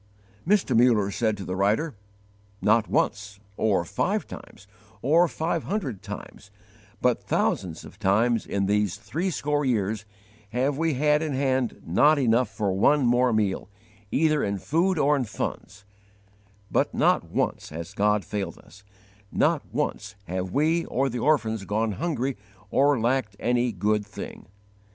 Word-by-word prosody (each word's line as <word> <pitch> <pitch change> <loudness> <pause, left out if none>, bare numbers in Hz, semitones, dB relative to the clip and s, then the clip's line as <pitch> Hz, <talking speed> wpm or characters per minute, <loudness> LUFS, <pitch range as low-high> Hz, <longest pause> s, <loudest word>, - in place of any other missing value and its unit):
Mr. 205 +1 +3
Muller 115 -4 +4
said 110 0 0
to 95 - -7
the 90 - -3
writer: 105 +12 +1 0.7
"Not 110 +1 +3
once, 100 0 -1 0.2
or 100 -6 +1
five - - -1
times, 100 - -11 0.4
or 165 +7 +4
five 165 +1 -2
hundred 145 - -3
times, 100 +1 -9 0.5
but 125 -1 +2
thousands 85 -4 -1
of 95 - -14
times 110 +3 +2
in 100 -1 0
these 105 -2 +1
threescore 150 -4 -1
years, 110 -4 0 0.5
have 135 +4 +1
we 160 0 0
had 150 +2 +3
in 155 -3 -2
hand 130 -2 0
not 145 - +4
enough 125 -2 +2
for 100 -3 -1
one 135 +8 +3
more 120 +1 +3
meal, 105 -3 0 0.4
either 155 +3 +2
in 100 0 -1
food 170 - +1
or 150 0 +3
in 135 - 0
funds; 100 -2 -6 0.9
but - - +1
not - - +2
once - - -2
has 85 +4 -7
God 105 0 +1
failed 105 -2 -4
us; 100 +3 -17 0.5
not - - +2
once 100 +2 -3
have 95 +1 -3
we 160 - +2
or 135 +2 0
the 120 0 -4
orphans 115 -7 +1
gone 110 +2 0
hungry 135 - -2 0.3
or 140 -1 +3
lacked 120 -3 0
any 120 0 +1
good 105 +2 0
thing." 100 -2 -9
115 Hz, 145 wpm, -26 LUFS, 100-145 Hz, 0.9 s, Muller